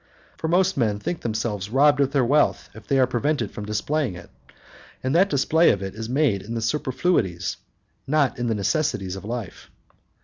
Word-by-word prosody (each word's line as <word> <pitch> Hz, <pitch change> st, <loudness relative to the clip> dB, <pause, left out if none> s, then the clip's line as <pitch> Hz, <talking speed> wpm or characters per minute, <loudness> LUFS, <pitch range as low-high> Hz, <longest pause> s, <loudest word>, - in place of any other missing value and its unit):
For 160 Hz, -, -3 dB
most 185 Hz, +2 st, +2 dB
men 110 Hz, -5 st, +1 dB
think 160 Hz, +12 st, -4 dB
themselves 110 Hz, -3 st, -3 dB
robbed 145 Hz, +4 st, +4 dB
of 140 Hz, -1 st, +2 dB
their 135 Hz, -3 st, +2 dB
wealth 145 Hz, +4 st, +1 dB
if 110 Hz, -, -13 dB
they 135 Hz, -, +2 dB
are 130 Hz, -, +5 dB
prevented 125 Hz, -1 st, -1 dB
from 105 Hz, -, -7 dB
displaying 115 Hz, +2 st, -1 dB
it, 90 Hz, -, -12 dB, 0.7 s
and 130 Hz, +1 st, 0 dB
that 190 Hz, +3 st, +4 dB
display 160 Hz, +3 st, +3 dB
of 100 Hz, -, +1 dB
it 95 Hz, -, -5 dB
is 110 Hz, +1 st, -6 dB
made 130 Hz, -7 st, +1 dB
in 115 Hz, +4 st, -6 dB
the 115 Hz, -, -2 dB
superfluities, 125 Hz, -, 0 dB, 0.5 s
not 140 Hz, -3 st, +1 dB
in 120 Hz, -, -1 dB
the 115 Hz, -, 0 dB
necessaries 100 Hz, -, -1 dB
of 95 Hz, -, -8 dB
life. 115 Hz, -3 st, -6 dB
120 Hz, 190 wpm, -23 LUFS, 105-150 Hz, 0.7 s, are